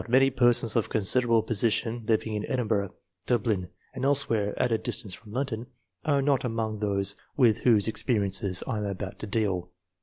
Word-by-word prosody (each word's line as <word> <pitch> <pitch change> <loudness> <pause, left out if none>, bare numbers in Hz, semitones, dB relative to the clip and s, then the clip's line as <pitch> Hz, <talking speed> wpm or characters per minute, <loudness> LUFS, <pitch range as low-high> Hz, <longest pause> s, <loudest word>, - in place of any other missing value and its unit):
many 135 +2 +4
persons 120 -3 +3
of 115 - +1
considerable 115 +2 +3
position 115 +1 0
living 110 -1 +1
in 105 0 -2
Edinburgh, 110 -6 -1 0.3
Dub 120 -4 +1
lin, 95 -6 -1 0.2
and 130 - -6
elsewhere 115 -7 +1
at 125 - +1
a 115 - +3
distance 100 -6 -2
from 105 +3 -11
London, 120 -2 -3 0.4
are 140 -2 +2
not 140 -2 +2
among 110 -3 -2
those 100 -1 -1 0.2
with 120 -6 +4
whose 110 -4 +3
experiences 100 -5 0
I 110 - -2
am - - -3
aljout 95 0 -7
to 110 - -5
deal. 95 -4 -1
110 Hz, 175 wpm, -27 LUFS, 105-125 Hz, 0.4 s, many